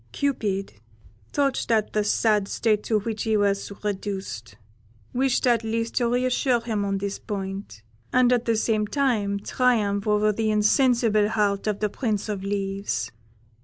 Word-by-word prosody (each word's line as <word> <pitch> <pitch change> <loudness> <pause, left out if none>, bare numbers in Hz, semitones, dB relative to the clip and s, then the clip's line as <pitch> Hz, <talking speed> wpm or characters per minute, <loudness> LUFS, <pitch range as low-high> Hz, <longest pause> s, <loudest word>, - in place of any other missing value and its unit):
"Cupid, 205 - -1 0.6
touched 280 -2 0
at 220 -2 +1
the 210 - +2
sad 210 -1 +2
state 215 -1 +1
to 215 -2 +1
which 220 0 -4
he 220 -1 +1
was 200 -1 0
reduced, 190 - -4 0.6
wished 260 +1 +1
at 235 -2 +3
least 230 +1 -2
to 240 -2 +2
re 250 +1 +1
assure 255 -1 +2
him 220 -3 -2
on 195 0 -1
this 200 0 -4
point, 195 - -6 0.3
and 250 0 +4
at 245 -1 +1
the 230 - +2
same 215 -1 +1
time 220 -7 0
triumph 210 -5 +1
over 210 0 +3
the 220 +1 -1
insensible 215 0 +3
heart 205 -2 0
of 210 -1 -1
the 210 - +1
Prince 215 -2 -2
of 200 -2 -3
Leaves. 195 - -2
210 Hz, 160 wpm, -25 LUFS, 200-230 Hz, 0.6 s, and